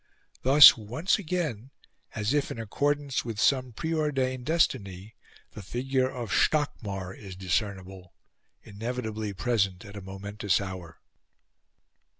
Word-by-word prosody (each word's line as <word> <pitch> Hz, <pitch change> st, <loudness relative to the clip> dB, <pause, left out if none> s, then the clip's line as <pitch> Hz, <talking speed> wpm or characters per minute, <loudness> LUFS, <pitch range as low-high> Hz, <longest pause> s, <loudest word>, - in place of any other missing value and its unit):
Thus, 140 Hz, +3 st, +9 dB
once 125 Hz, -, -1 dB
again, 155 Hz, -, -3 dB, 0.5 s
as 105 Hz, +3 st, -1 dB
if 145 Hz, -1 st, +1 dB
in -, -, -6 dB
accordance 145 Hz, +5 st, -1 dB
with 115 Hz, -3 st, -5 dB
some 130 Hz, 0 st, +2 dB
preordained 135 Hz, -3 st, -2 dB
destiny, 105 Hz, -, 0 dB, 0.4 s
the -, -, -9 dB
figure 130 Hz, +5 st, -1 dB
of 120 Hz, -4 st, -6 dB
Stockmar 100 Hz, -11 st, 0 dB
is 95 Hz, -3 st, -10 dB
discernible 95 Hz, -1 st, -3 dB, 0.5 s
inevitably 110 Hz, -1 st, -4 dB
present 95 Hz, -1 st, -1 dB
at 100 Hz, 0 st, -11 dB
a 100 Hz, -, -7 dB
momentous 100 Hz, +1 st, -2 dB
hour. 95 Hz, -4 st, -8 dB
110 Hz, 115 wpm, -27 LUFS, 100-135 Hz, 0.5 s, Thus